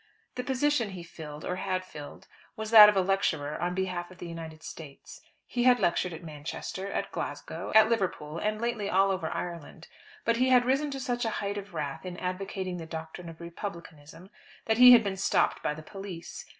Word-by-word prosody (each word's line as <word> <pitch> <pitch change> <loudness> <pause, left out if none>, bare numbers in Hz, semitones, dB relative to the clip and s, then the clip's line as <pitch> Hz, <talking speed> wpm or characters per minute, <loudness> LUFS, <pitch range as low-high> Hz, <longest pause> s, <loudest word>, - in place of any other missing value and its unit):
The 250 - -4
position 265 -2 +1
he 185 -3 -8
filled, 155 -3 -9
or 180 - -2
had 185 -1 -2
filled, 150 -5 -10 0.3
was 220 0 -5
that 210 -2 +11
of 210 - +1
lecturer 160 -6 0
on 180 +1 -1
behalf 180 -2 -2
of 185 - -14
the - - -8
United 160 -1 -8
States. 145 -4 -10 0.2
He 245 -1 -1
had 250 -1 +6
lectured 175 +1 +1
at 165 0 -8
Manchester, 165 +5 -6
at - - -3
Glasgow, - - -5
at 220 0 +8
Liverpool, 180 -8 -1
and 215 0 -1
lately 230 -3 -2
all 195 +1 +3
over 190 -1 -2
Ireland. 170 -4 -6 0.4
But 230 0 +2
he 255 +2 +3
had 250 -1 +5
risen 275 +4 +1
to 275 -1 -5
such 245 -2 -2
a 225 - +1
height 205 0 -2
of 200 -3 -11
wrath 145 -3 -4
in 180 -1 -6
advocating 185 0 -4
the 165 -2 -7
doctrine 160 +1 -7
of 165 - -12
Republicanism 170 -1 -9 0.3
that 220 +1 +1
he 250 0 +11
had 235 -2 +7
been 195 -2 -3
stopped 190 - +1
by 150 - -1
the 155 - -10
police. 195 -2 -8
185 Hz, 200 wpm, -29 LUFS, 165-220 Hz, 0.4 s, that